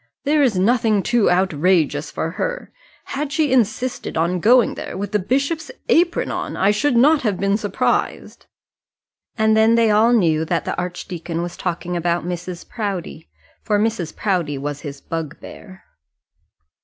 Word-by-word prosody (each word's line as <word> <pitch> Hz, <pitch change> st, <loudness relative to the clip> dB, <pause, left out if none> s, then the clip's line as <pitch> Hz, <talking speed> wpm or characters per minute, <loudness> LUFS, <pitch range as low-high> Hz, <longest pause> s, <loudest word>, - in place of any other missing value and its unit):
There 295 Hz, +1 st, +2 dB
is 245 Hz, -9 st, +2 dB
nothing 215 Hz, 0 st, +2 dB
too 240 Hz, -3 st, +2 dB
outrageous 175 Hz, -4 st, +1 dB
for 165 Hz, -, -3 dB
her. -, -, -4 dB, 0.3 s
Had 290 Hz, +1 st, -4 dB
she 310 Hz, -3 st, +1 dB
insisted 245 Hz, -3 st, 0 dB
on 170 Hz, +3 st, +1 dB
going 240 Hz, +5 st, +4 dB
there -, -, -7 dB
with 200 Hz, 0 st, -4 dB
the 210 Hz, -, +1 dB
bishop's 280 Hz, -, -1 dB, 0.2 s
apron 345 Hz, +1 st, +2 dB
on, -, -, -4 dB
I 195 Hz, +2 st, +3 dB
should 250 Hz, +5 st, +1 dB
not 295 Hz, +5 st, +5 dB
have 210 Hz, -6 st, -1 dB
been 200 Hz, 0 st, +1 dB
surprised." 205 Hz, -1 st, -2 dB, 0.9 s
And 220 Hz, -1 st, +3 dB
then 220 Hz, +1 st, +4 dB
they 230 Hz, -2 st, +3 dB
all 220 Hz, +3 st, +4 dB
knew 165 Hz, -9 st, +3 dB
that 165 Hz, +1 st, -1 dB
the -, -, -2 dB
archdeacon 175 Hz, -1 st, -4 dB
was 175 Hz, 0 st, -6 dB
talking 180 Hz, 0 st, -3 dB
about 170 Hz, 0 st, -1 dB
Mrs. 175 Hz, 0 st, -6 dB
Proudie, 195 Hz, -, -5 dB, 0.3 s
for 210 Hz, -, 0 dB
Mrs. 210 Hz, -6 st, -1 dB
Proudie 175 Hz, -8 st, -1 dB
was 145 Hz, +1 st, -5 dB
his 140 Hz, -3 st, -8 dB
bugbear. 165 Hz, +4 st, -8 dB
195 Hz, 155 wpm, -20 LUFS, 170-235 Hz, 0.9 s, not